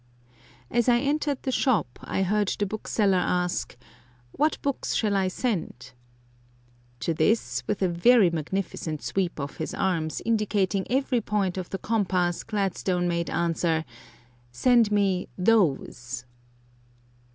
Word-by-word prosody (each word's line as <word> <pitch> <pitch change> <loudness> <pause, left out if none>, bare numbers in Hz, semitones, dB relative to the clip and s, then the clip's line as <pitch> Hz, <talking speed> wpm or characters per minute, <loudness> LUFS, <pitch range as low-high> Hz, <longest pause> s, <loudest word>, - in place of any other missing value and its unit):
As 240 +1 +2
I 240 - +5
entered 285 +1 -1
the 265 - -1
shop 230 - +1
I 190 - -1
heard 205 +2 +1
the 205 - 0
bookseller 200 -1 +1
ask: 180 -5 -1 0.5
"What 305 +2 0
books 280 -2 -1
shall 210 -3 +1
I 190 -1 +2
send?" 185 - -3 1.1
To 165 - 0
this, 155 - +1
with 200 -2 -1
a - - +4
very 185 +3 +5
magnificent 165 -1 -3
sweep 185 -4 -1
of 140 0 -5
his 160 - -4
arms 165 -5 -1
indicating 205 -3 +1
every 260 -2 +1
point 200 -4 -1
of 185 -2 -5
the 195 - -3
compass, 185 -5 0
Gladstone 190 -3 -1
made 170 -1 -1
answer: 165 -1 0 0.7
"Send 230 - +3
me 195 -3 +1
THOSE!" 135 - +1
190 Hz, 130 wpm, -26 LUFS, 170-220 Hz, 1.1 s, I